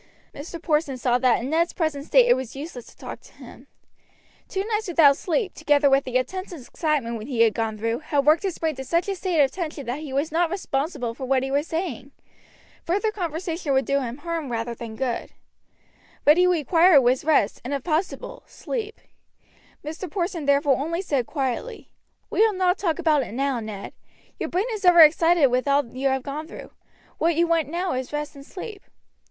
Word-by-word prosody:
Mr. 330 +4 -8
Porson 300 -4 0
saw 245 0 +1
that 250 -2 +3
in 260 +4 -4
Ned's 335 +2 +1
present 315 -4 -2
state - - +5
it - - +6
was 260 -1 -5
useless 275 -4 -8
to - - -17
talk - - -8
to - - -19
him. - - -14 0.8
Two 385 0 -3
nights 435 -1 -2
without 315 -5 +5
sleep, 375 - -1
together 290 -2 +2
with 270 0 +3
the 255 - -6
intense 370 +10 -4
excitement 260 -6 -3
he 240 -4 0
had 225 -2 +5
gone 225 -2 -2
through, 230 +2 -1
had 290 -3 -1
worked 310 +2 +5
his 380 -4 -3
brain 320 -1 -1
to 265 - -5
such 335 +7 0
a 400 - 0
state 360 -3 -1
of 270 - 0
tension 315 -5 -5
that 245 +5 -3
he 305 -3 -7
was 280 +4 -1
not 335 +1 +1
responsible 280 -8 -2
for 260 +2 -6
what 260 0 +1
he 270 - -3
was 290 +3 0
saying. 320 -7 -4 0.7
Further 405 +6 0
conversation 335 -5 -3
would 265 0 +2
do 280 0 +1
him 245 -1 -5
harm 320 -3 -4
rather 230 0 -2
than 230 -1 -8
good. 250 -1 -3 0.9
What 300 +3 +6
he 360 0 +5
required 335 -1 +5
was 250 +1 +2
rest 290 -9 +2
and, 250 - -5
if 280 -2 -2
possible, 380 +10 -2
sleep. 445 -2 -6 0.8
Mr. 320 +4 -6
Porson 345 -2 -3
therefore 280 -1 +3
only 335 +6 -2
said 275 - -1
quietly: 280 - -4 0.4
"We - - -2
will 445 -1 +3
not 370 0 +1
talk 335 -5 0
about 315 -4 +2
it 220 - -6
now, 270 -1 0
Ned; 215 -3 -7 0.5
your - - -3
brain 370 +4 0
is 430 -3 -5
over 355 -2 +7
excited 325 +1 +6
with 255 +3 0
all 280 0 +3
you 270 +2 0
have 265 -1 -1
gone 295 +3 -5
through. - - -10 0.5
What 335 0 +2
you 340 +2 +3
want 330 -3 +1
now 350 +3 -2
is 255 0 -4
rest 295 0 -4
and 275 - -11
sleep." 400 +6 -9
300 Hz, 205 wpm, -24 LUFS, 265-345 Hz, 0.9 s, over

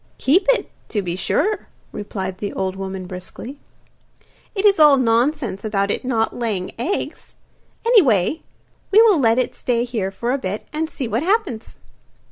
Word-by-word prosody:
'Keep 360 +9 +3
it, - - +2 0.2
to 205 -3 -1
be 175 -1 -3
sure!' 395 - 0 0.2
replied 190 -2 -5
the 205 - -3
old 190 0 -2
woman 190 -1 -5
briskly. 185 +9 -8 1.0
'It 395 +1 0
is 400 -4 +5
all 295 -2 +7
nonsense 240 -3 +1
about 200 -2 0
it - - -2
not 230 -3 0
laying 210 -6 -2
eggs. 335 +12 -4 0.5
Anyway, 310 - +4 0.5
we 410 - +6
will 415 -8 +5
let 230 -3 +3
it 255 - 0
stay 240 -1 -1
here 220 -6 -2
for 235 +5 -3
a 275 - 0
bit, 195 -1 -4
and 315 +1 -2
see 265 -6 -4
what 225 +3 -1
happens. 355 - -1
235 Hz, 160 wpm, -21 LUFS, 195-305 Hz, 1.0 s, all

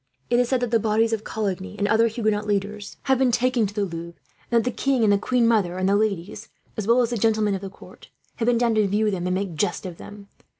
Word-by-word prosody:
It 240 - +4
is 245 -1 +1
said 260 -2 +1
that 245 -2 -2
the 230 - +3
bodies 225 +1 +1
of 220 -1 -2
Coligny, 200 -2 -4
and 205 - 0
other 225 +2 +4
Huguenot 215 -2 -1
leaders, 205 0 -3
have 265 -2 +2
been 260 -2 +3
taken 240 -2 +1
to 200 - -10
the 205 - 0
Louvre; 170 -1 -8 0.3
and 235 - +2
that 230 - +3
the 250 - -3
king 270 -3 +1
and 205 -2 +4
the - - +4
queen 240 +2 +1
mother 200 -6 +1
and 185 0 0
the 200 - +3
ladies, 205 -3 -2 0.3
as 215 -2 -4
well 240 +2 +4
as 235 - -2
the 240 - -1
gentlemen 215 -1 +2
of 190 - -3
the 195 - -6
court, - - -16 0.3
have 230 - -1
been 245 -1 +3
down 235 -1 +2
to 215 -2 +2
view 210 +2 +1
them 180 -2 -3
and 180 - 0
make 195 +1 -2
a - - -9
jest 175 +4 -2
of 175 -3 -7
them. 205 -1 -11
215 Hz, 275 wpm, -23 LUFS, 200-230 Hz, 0.3 s, It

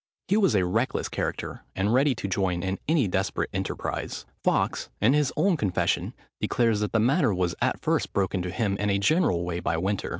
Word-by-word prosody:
He 195 - +4
was 200 - +3
a 95 -2 +3
reckless 90 - 0
character, - - -4
and 100 +4 +1
ready 135 +1 +3
to 100 - -4
join 90 -2 0
in 95 0 -2
any 150 -7 +3
desperate 95 +1 -1
enterprise. - - -3 0.2
Fawkes, - - 0
in 115 +6 +4
his 150 -2 +2
own 190 -3 +3
confession, 100 -9 0 0.2
declares, 115 -3 +1
that 105 -1 -1
the 115 - +2
matter 120 -1 +3
was 90 -1 0
at - - +1
first - - 0
broken 95 -1 0
to 90 - -3
him 100 +2 -1
in 105 +1 0
a 100 - +2
general 100 - +2
way 85 0 -2
by 80 - -1
Winter. 95 +4 -1
100 Hz, 200 wpm, -26 LUFS, 95-130 Hz, 0.2 s, He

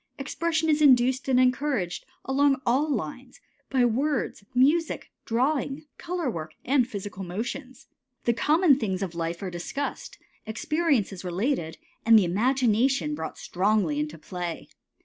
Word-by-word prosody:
Expression 320 +3 -1
is 305 -1 +2
induced 260 -2 +4
and 255 -1 +4
encouraged 255 -7 +1 0.2
along 275 0 +3
all 265 +6 +2
lines, 245 - -4 0.3
by 260 -2 +3
words, 260 -1 -1
music, 305 +6 +2
drawing, 275 +4 0
color 350 -3 -3
work, 160 -8 -4
and 260 -2 +3
physical 200 -4 -6
motions. 245 +8 -5 0.4
The 235 - +2
common 300 +3 +4
things 195 -5 -1
of 180 -3 -4
life 170 +1 -3
are 185 - -4
discussed, 280 - -5 0.3
experiences 230 - 0
related, 180 - -1 0.3
and 225 0 +7
the 205 - +4
imagination 255 - +2
brought 295 - -5
strongly 185 -5 +1
into 150 +2 -3
play. 175 +1 -6
250 Hz, 130 wpm, -26 LUFS, 190-280 Hz, 0.4 s, and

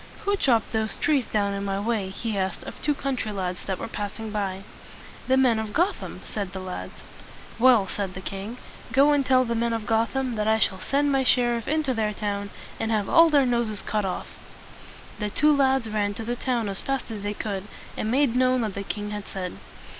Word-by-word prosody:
"Who 405 0 +3
chopped 240 - +2
those 220 -1 -1
trees 290 -7 +2
down 200 -2 0
in 200 0 -3
my 195 0 -1
way?" 210 -2 -1
he 220 +3 -4
asked 190 -2 -2
of - - -9
two 295 -1 +1
country 260 -6 -2
lads 185 -3 -3
that 190 -2 -2
were - - -5
passing 215 0 -5
by. 195 -2 -2 0.6
"The 260 0 +4
men 250 -4 +4
of 215 -1 -4
Gotham," 355 +5 -1
said 200 -3 -5
the 190 - -4
lads. 185 -1 -7 0.6
"Well," 235 -5 +6
said 195 -1 -3
the - - -5
king, 200 +5 -6 0.3
"go 280 +3 +5
and 290 -1 +3
tell 255 -1 +4
the 235 - -1
men 235 0 0
of 225 -2 -3
Gotham 235 +4 +1
that 215 -1 -1
I 220 0 +4
shall 190 -3 +1
send 285 +7 +1
my 270 -1 +3
sher 245 -2 +3
iff 230 -2 -5
into 305 -3 +1
their 215 -2 -1
town, 200 -1 -2 0.3
and 225 - -1
have 215 -3 0
all 330 0 +7
their 285 -3 +4
noses 235 -4 0
cut 210 -1 -1
off." 190 -2 -3 0.9
The 210 -1 -1
two 300 +7 +4
lads 265 -3 +3
ran 205 -2 -1
to 225 - -5
the 240 +2 -2
town 245 -3 -1
as 195 -1 -2
fast 270 -3 -2
as 215 -2 -5
they 205 +1 -3
could, 200 -3 -3 0.3
and 215 - -2
made 260 0 +2
known 255 0 +3
what 215 -3 -2
the 200 - -4
king 205 +1 -4
had 210 -1 -5
said. 185 -2 -5
220 Hz, 220 wpm, -25 LUFS, 200-255 Hz, 0.9 s, all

